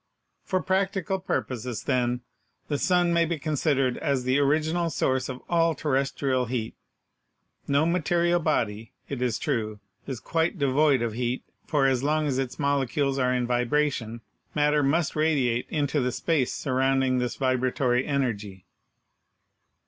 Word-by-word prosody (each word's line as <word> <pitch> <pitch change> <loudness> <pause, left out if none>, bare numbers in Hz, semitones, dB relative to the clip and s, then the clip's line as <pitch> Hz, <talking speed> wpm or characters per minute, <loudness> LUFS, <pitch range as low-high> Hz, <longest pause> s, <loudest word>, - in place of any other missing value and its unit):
For 185 -2 -1
practical 190 -1 0
purposes, 125 - -3
then, 125 -1 0 0.5
the 145 -2 0
sun 175 -2 +2
may 170 0 +4
be 170 0 -1
considered 145 -4 0
as 140 -4 0
the 130 +2 +2
original 160 +4 +1
source 130 -3 0
of 130 0 -7
all 165 -1 +2
terrestrial 135 -2 0
heat. 115 -2 -3 0.9
No 145 +2 +3
material 175 0 +2
body, 115 -9 -1 0.2
it 135 -3 -4
is 120 -4 0
true, 110 -6 -2 0.3
is 130 -4 -4
quite 165 - -1
devoid 140 -2 +3
of 115 -2 -2
heat, 120 +2 -2 0.2
for 145 -3 +2
as 130 -2 +2
long 155 +2 +1
as 135 -3 0
its 130 -2 -3
molecules 140 -1 0
are 125 -1 +2
in 125 -1 0
vibration, 120 -1 0 0.3
matter 150 0 +3
must 150 +3 +1
radiate 140 -6 +1
into 145 -2 0
the 125 0 0
space 135 +1 0
surrounding 130 -1 +1
this 125 -1 -2
vibratory 130 -1 +1
energy. 105 -10 -2
135 Hz, 140 wpm, -26 LUFS, 125-155 Hz, 0.9 s, may